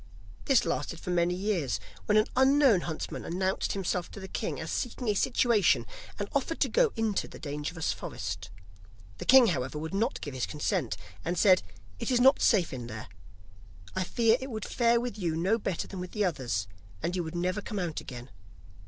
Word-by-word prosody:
This 270 -4 +4
lasted 170 - -2
for 180 - -4
many 175 0 +2
years, 185 - -1 0.3
when 210 - +4
an 215 - +5
unknown 265 -6 +5
huntsman 160 -2 -5
announced 185 +2 -1
himself 185 -2 -2
to - - -9
the 190 - -7
king - - -3
as - - -5
seeking 245 0 -3
a - - +4
situation, 235 -1 +3 0.3
and - - -3
offered - - -1
to - - +3
go 485 -2 +3
into 225 -3 0
the - - -11
dangerous 150 +2 -3
forest. 90 +1 -5 0.7
The - - -5
king, 260 -1 +8
however, 135 -3 -2
would 160 +4 -5
not 225 +6 0
give 145 - -6
his 130 -2 -2
consent, 140 -7 -1 0.3
and 175 - -2
said: 185 0 +6 0.4
'It - - -2
is 250 -2 +3
not 265 +2 +6
safe 185 - +3
in 120 -2 -5
there; 110 -1 -7 0.9
I 190 - +1
fear 225 +4 +3
it 265 - -6
would 220 -3 -4
fare 235 -1 +3
with 240 -3 -4
you 170 -4 -1
no 190 +8 +1
better 190 -5 -2
than 190 - -7
with 180 0 -6
the 210 -2 +1
others, 120 - -1 0.4
and 175 - -1
you 180 - 0
would 160 +1 -6
never 180 +4 -1
come 210 0 -5
out 175 -5 -2
again. 125 0 -9
185 Hz, 195 wpm, -29 LUFS, 160-225 Hz, 0.9 s, king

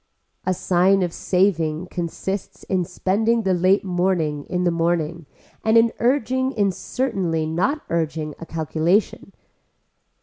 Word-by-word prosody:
A 185 - +3
sign 185 +2 +3
of 175 -2 -2
saving 175 -4 +1
consists 180 +3 -4
in 185 -2 0
spending 220 +7 0
the 190 -2 +2
late 185 +3 +3
morning 175 -5 0
in 180 -1 -2
the 175 - +2
morning 165 -1 -1 0.4
and 220 +1 +4
in 230 0 +4
urging 260 +1 +1
in 205 -4 +2
certainly 180 -7 -2
not 195 - 0
urging 160 -2 -2
a 165 - -8
calculation. 165 +6 0
180 Hz, 130 wpm, -22 LUFS, 165-205 Hz, 0.4 s, and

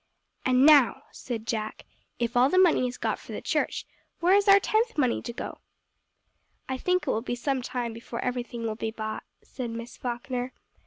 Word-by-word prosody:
"And 255 +1 +5
now," 290 -5 +6
said 230 -3 -6
Jack, 215 -2 -3 0.3
"if 235 0 -2
all 250 +2 +5
the 370 - +1
money 345 -9 +5
is 250 - -6
got - - -1
for - - -10
the - - -3
church, - - -1 0.3
where 355 +3 +4
is 405 +1 +4
our 395 0 +8
tenth 440 +1 0
money 255 -5 +2
to 235 - -5
go 235 - -5
to?" - - -18 1.1
"I - - -2
think 365 +1 +1
it 265 - +1
will 220 - 0
be 245 0 -3
some 265 +2 -1
time 245 -2 -3
before 230 +1 -7
everything 245 -2 -3
will 225 -1 -1
be 220 0 -3
bought," 215 -1 -5 0.2
said 250 -3 -6
Miss 230 +1 -7
Falkner. 245 +1 -4
250 Hz, 200 wpm, -27 LUFS, 235-285 Hz, 1.1 s, our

